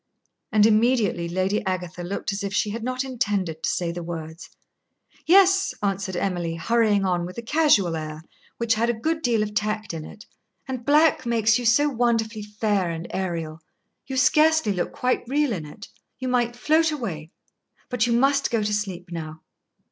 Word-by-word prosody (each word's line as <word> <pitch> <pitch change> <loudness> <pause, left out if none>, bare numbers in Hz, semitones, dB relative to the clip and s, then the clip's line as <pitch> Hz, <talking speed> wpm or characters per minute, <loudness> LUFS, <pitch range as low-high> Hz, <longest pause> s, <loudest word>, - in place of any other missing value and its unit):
And 210 -1 +5
immediately 215 -6 +2
Lady 190 +4 0
Agatha 180 -2 -4
looked 195 +3 -3
as 200 +1 -4
if 200 - -3
she 210 - +1
had 225 +1 -5
not 255 +1 -2
intended 205 -11 -2
to - - 0
say 175 -2 -1
the 175 +1 -6
words. 165 0 -7 0.8
"Yes," 385 +2 +5
answered 195 -1 -1
Emily, 175 -3 -2
hurrying 210 +2 +2
on 180 -2 0
with 180 +4 -7
a 235 - -5
casual 230 - +3
air 155 0 -6 0.3
which 235 -1 +1
had 230 +2 0
a - - +2
good 320 +5 -1
deal 235 -6 +1
of 210 0 -5
tact 215 -1 -2
in 160 -2 -5
it. 210 - -12 0.4
"And 255 -3 -5
black 300 -3 +4
makes 220 -1 +3
you 245 - -5
so 290 +6 +4
wonderfully 230 -4 0
fair 210 -3 -1
and 165 0 -5
aërial. 165 -4 -4 0.5
You 265 -1 -4
scarcely 305 -2 +4
look 180 - -2
quite 250 0 0
real 285 -1 +1
in 160 -6 -5
it; 205 +7 -11 0.3
you 260 - -4
might 240 -1 0
float 315 +6 +2
away. 185 - -5 0.6
But 245 -2 0
you 235 - +1
must 275 +3 +2
go 230 -3 0
to 210 0 -1
sleep 190 -4 -4
now." 160 -1 -6
210 Hz, 180 wpm, -24 LUFS, 180-245 Hz, 0.8 s, And